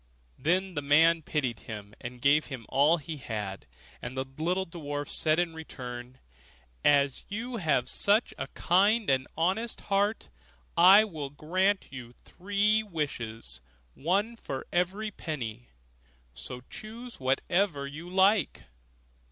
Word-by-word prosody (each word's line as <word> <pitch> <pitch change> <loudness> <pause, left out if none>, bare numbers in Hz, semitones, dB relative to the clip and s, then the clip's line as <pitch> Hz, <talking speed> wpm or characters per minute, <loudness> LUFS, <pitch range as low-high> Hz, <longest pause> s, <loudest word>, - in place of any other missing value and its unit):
Then 185 +4 +1
the 145 - -2
man 160 +4 +5
pitied 130 -8 -2
him, 105 0 -8
and 125 0 -8
gave 145 +2 +5
him 130 -5 -7
all 150 +5 +4
he 155 0 -6
had; 105 - -5 0.3
and 125 +2 -6
the 130 - -1
little 180 +4 0
dwarf 145 -4 -5
said 155 0 +1
in 175 -1 0
return, 125 -5 -8 0.7
'As 140 -2 +3
you 235 +4 -4
have 155 - +1
such 210 +4 +2
a - - -3
kind 190 - +3
honest 195 +8 0
heart, 200 - 0 0.5
I 190 +5 +8
will 155 -9 -5
grant 185 +7 0
you 125 -3 -9
three 205 - 0
wishes 120 - -5 0.3
one 200 +10 0
for 135 -11 -6
every 195 +5 0
penny; 120 - -6 0.6
so 125 - -8
choose 235 +3 -9
whatever 145 +4 +1
you 155 +5 -8
like. 190 -1 +3
160 Hz, 125 wpm, -29 LUFS, 130-195 Hz, 0.7 s, I